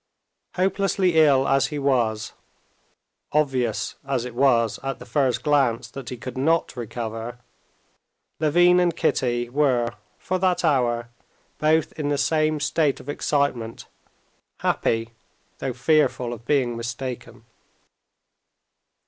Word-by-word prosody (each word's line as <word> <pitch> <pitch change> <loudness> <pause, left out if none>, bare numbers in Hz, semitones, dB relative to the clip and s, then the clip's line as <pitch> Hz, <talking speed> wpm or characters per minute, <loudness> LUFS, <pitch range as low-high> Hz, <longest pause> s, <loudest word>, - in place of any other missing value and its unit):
Hopelessly 190 -1 +1
ill 140 -4 +5
as 135 -1 +3
he 150 - -5
was, 120 -6 0 1.0
obvious 130 -7 0
as 135 -3 -2
it 125 - -7
was 120 -4 +2
at 135 -1 -3
the - - -11
first 130 0 0
glance 130 -6 +1
that 135 -4 -7
he 125 - -6
could 130 +3 -7
not 160 +4 +1
recover, 115 0 -5 1.0
Levin 175 +4 +4
and 175 -2 +2
Kitty 120 -7 0
were 125 -3 +1 0.3
for 185 0 -2
that 180 -1 +1
hour 120 -5 +1 0.5
both 155 0 +2
in 145 -1 -1
the 145 - +1
same 155 +1 +1
state 150 -1 +1
of 145 - -11
excitement, 140 -6 -1 0.8
happy, 115 0 0 0.5
though 135 - -2
fearful 125 -2 +1
of 115 0 -11
being 130 -4 +1
mistaken. 120 +2 -6
135 Hz, 120 wpm, -24 LUFS, 120-150 Hz, 1.0 s, ill